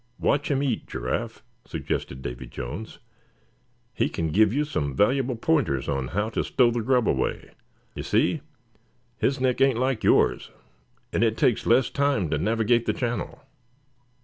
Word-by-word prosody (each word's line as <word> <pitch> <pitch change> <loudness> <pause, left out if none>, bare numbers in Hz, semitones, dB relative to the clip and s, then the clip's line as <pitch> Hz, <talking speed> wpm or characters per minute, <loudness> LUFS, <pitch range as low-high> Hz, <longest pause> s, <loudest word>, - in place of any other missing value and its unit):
"Watch 145 0 +1
him 140 -1 +1
eat, 130 -6 -1
Giraffe," 60 +1 -4 0.2
suggested 65 +1 -4
Davy - - -6
Jones; 75 - -7 1.0
"he - - 0
can 80 -1 -2
give 105 +4 +4
you 145 +5 0
some 70 - -2
valuable 125 - +2
pointers 115 - 0
on 70 -2 -1
how 105 - -1
to 115 - -1
stow 125 -3 +3
the 120 0 -1
grub 125 -1 +2
away. 65 - -1 0.4
You - - -5
see, - - +1 0.8
his 135 +1 +1
neck 130 -1 +1
ain't 135 -3 +4
like 130 -2 0
yours, - - +3 0.6
and 110 - +2
it 110 -1 +1
takes 120 - +1
less 120 +2 +4
time 140 - +1
to 75 - +1
navigate 115 +5 +1
the - - +2
channel." 120 -1 -3
115 Hz, 155 wpm, -25 LUFS, 80-130 Hz, 1.0 s, give